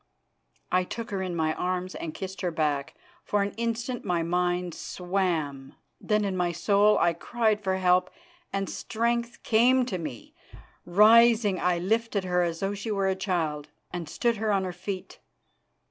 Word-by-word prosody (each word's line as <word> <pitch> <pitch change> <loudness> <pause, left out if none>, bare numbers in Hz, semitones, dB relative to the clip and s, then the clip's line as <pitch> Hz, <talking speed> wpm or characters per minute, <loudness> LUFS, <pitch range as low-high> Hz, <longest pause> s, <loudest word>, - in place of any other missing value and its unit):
I 185 0 +3
took 230 +5 -6
her 195 -1 -2
in 185 -2 -3
my 160 -1 +1
arms 185 +1 -2
and 160 - -5
kissed 190 0 -6
her 180 - 0
back. 150 -4 -1 0.3
For 205 -1 +1
an 200 - -2
instant 235 +2 -3
my 175 -3 0
mind 175 0 0
swam. 170 -9 -2 0.2
Then 210 -1 +1
in 195 -2 -1
my 180 -1 0
soul 200 +5 +3
I 170 - +3
cried 215 +3 0
for 190 -1 0
help, 180 0 +3 0.4
and 195 0 -2
strength 235 +1 -2
came 250 +3 +4
to 190 -7 -3
me. 145 -8 -7 0.5
Rising, 215 +1 +5
I 180 0 +1
lifted 215 +2 0
her 180 -1 +1
as 170 -1 -2
though 195 +1 0
she 205 +3 -5
were 195 -2 +1
a 190 - +1
child, 165 -6 -2 0.2
and 170 -3 -5
stood 235 +5 0
her 215 0 0
on 195 -2 +2
her 185 -1 -4
feet. 185 +1 -6
190 Hz, 170 wpm, -27 LUFS, 175-215 Hz, 0.5 s, Rising